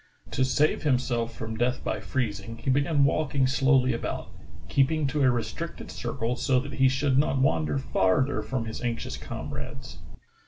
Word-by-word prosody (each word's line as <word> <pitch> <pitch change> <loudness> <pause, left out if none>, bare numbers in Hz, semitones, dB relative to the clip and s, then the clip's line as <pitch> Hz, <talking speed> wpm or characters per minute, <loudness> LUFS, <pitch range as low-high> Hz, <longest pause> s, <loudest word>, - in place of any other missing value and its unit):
To 130 - +1
save 145 +4 +2
himself 125 -4 0
from 110 0 -5
death 125 +2 0
by - - -2
freezing, 115 -3 -3
he 120 +3 -1
began 145 +2 +3
walking 140 -1 +2
slowly 130 -1 +3
about, 115 - -4 0.4
keeping 150 +3 +2
to 145 +2 0
a 130 - +5
restricted 120 -2 -3
circle 115 +2 -2
so 130 0 +2
that 140 +1 -6
he 130 +2 +4
should 135 0 +2
not 140 -1 +2
wander 80 - +2
farther 100 - +1
from 115 +2 -3
his 110 - -6
anxious 120 -2 -3
comrades. - - -7
130 Hz, 160 wpm, -27 LUFS, 115-135 Hz, 0.4 s, a